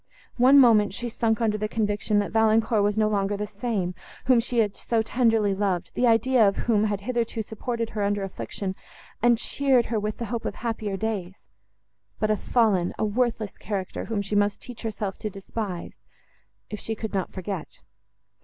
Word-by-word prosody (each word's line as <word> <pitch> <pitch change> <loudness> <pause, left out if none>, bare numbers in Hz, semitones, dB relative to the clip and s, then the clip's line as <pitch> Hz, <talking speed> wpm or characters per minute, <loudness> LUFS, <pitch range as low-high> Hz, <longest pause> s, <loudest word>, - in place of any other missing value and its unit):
One 255 +3 +7
moment, 215 -7 +6
she 240 - -4
sunk 225 -1 0
under 215 -2 +1
the 215 - -1
conviction, 210 -1 0
that 205 -1 0
Valancourt 220 0 +3
was 205 +1 +1
no 215 -1 +3
longer 205 -1 0
the 210 - -2
same, 205 -5 -2 0.3
whom 255 -2 +5
she 240 +1 -2
had 210 -3 +2
so 230 -2 0
tenderly 225 -3 +2
loved, 190 -3 -1
the 245 - +2
idea 230 0 +4
of 195 - +1
whom 215 -3 +3
had 205 -2 -1
hitherto 230 0 -2
supported 230 +2 -4
her 210 - -3
under 200 0 0
affliction, 195 0 -4 0.5
and 240 0 +5
cheered 260 0 +2
her 220 - +2
with 210 0 -3
the 235 - -3
hope 230 - -3
of - - -3
happier 220 -4 -3
days,—but 210 +1 -6
a - - +3
fallen, 205 -6 +1
a - - 0
worthless 225 -1 -1
character, 195 -2 -4
whom 215 -3 -2
she 200 - -6
must 205 0 +2
teach 245 -2 -10
herself 210 -3 -4
to 215 - -3
despise—if 195 +1 -8
she 225 - -4
could 220 0 -5
not 190 -2 -1
forget. 185 -3 -6
215 Hz, 180 wpm, -25 LUFS, 205-230 Hz, 0.5 s, One